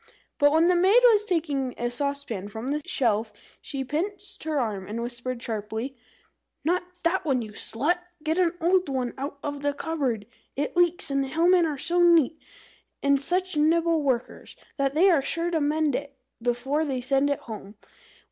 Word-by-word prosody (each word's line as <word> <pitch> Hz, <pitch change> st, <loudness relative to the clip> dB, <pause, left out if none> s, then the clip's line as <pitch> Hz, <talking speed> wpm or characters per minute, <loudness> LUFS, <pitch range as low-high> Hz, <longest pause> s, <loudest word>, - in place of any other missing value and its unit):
But 290 Hz, -1 st, +5 dB
when 320 Hz, +2 st, +4 dB
the 360 Hz, +1 st, +4 dB
maid 380 Hz, +7 st, +6 dB
was 435 Hz, -4 st, +6 dB
taking 295 Hz, -, -1 dB
a 240 Hz, 0 st, -2 dB
saucepan 280 Hz, -7 st, -3 dB
from 220 Hz, +5 st, -6 dB
the 300 Hz, +1 st, -1 dB
shelf, 220 Hz, -3 st, +1 dB, 0.3 s
she 275 Hz, -2 st, -4 dB
pinched 390 Hz, +7 st, -4 dB
her 310 Hz, -2 st, 0 dB
arm, 205 Hz, -6 st, -2 dB
and 220 Hz, +3 st, -4 dB
whispered 240 Hz, +1 st, -5 dB
sharply 220 Hz, +4 st, -4 dB, 0.7 s
"Not 360 Hz, +2 st, -2 dB
that, 340 Hz, +3 st, +2 dB
you 255 Hz, -8 st, -1 dB
slut! 290 Hz, -, 0 dB, 0.2 s
Get 320 Hz, +2 st, 0 dB
the 355 Hz, -2 st, +2 dB
old 360 Hz, 0 st, +2 dB
one 255 Hz, -3 st, -2 dB
out 280 Hz, +2 st, -5 dB
of 285 Hz, -1 st, -4 dB
the 285 Hz, 0 st, 0 dB
cupboard. 270 Hz, -10 st, -2 dB, 0.3 s
It 290 Hz, +4 st, -2 dB
leaks, 350 Hz, -1 st, +2 dB
and 275 Hz, 0 st, +1 dB
the -, -, -4 dB
Hillmen 340 Hz, +4 st, +4 dB
are 300 Hz, -2 st, -3 dB
so 350 Hz, +6 st, +1 dB
neat, 330 Hz, -3 st, +4 dB, 0.6 s
and 280 Hz, -1 st, +3 dB
such 365 Hz, +4 st, 0 dB
nimble 325 Hz, +2 st, +3 dB
workers, 255 Hz, -4 st, -2 dB, 0.2 s
that 275 Hz, 0 st, 0 dB
they 350 Hz, +5 st, +5 dB
are 320 Hz, -5 st, +4 dB
sure 335 Hz, +5 st, -1 dB
to 325 Hz, -2 st, +1 dB
mend 300 Hz, 0 st, +1 dB
it 280 Hz, +1 st, -4 dB, 0.2 s
before 245 Hz, +6 st, 0 dB
they 270 Hz, -4 st, -2 dB
send 270 Hz, +3 st, +1 dB
it 285 Hz, 0 st, -1 dB
home. 210 Hz, -4 st, -9 dB
285 Hz, 175 wpm, -26 LUFS, 255-335 Hz, 0.7 s, maid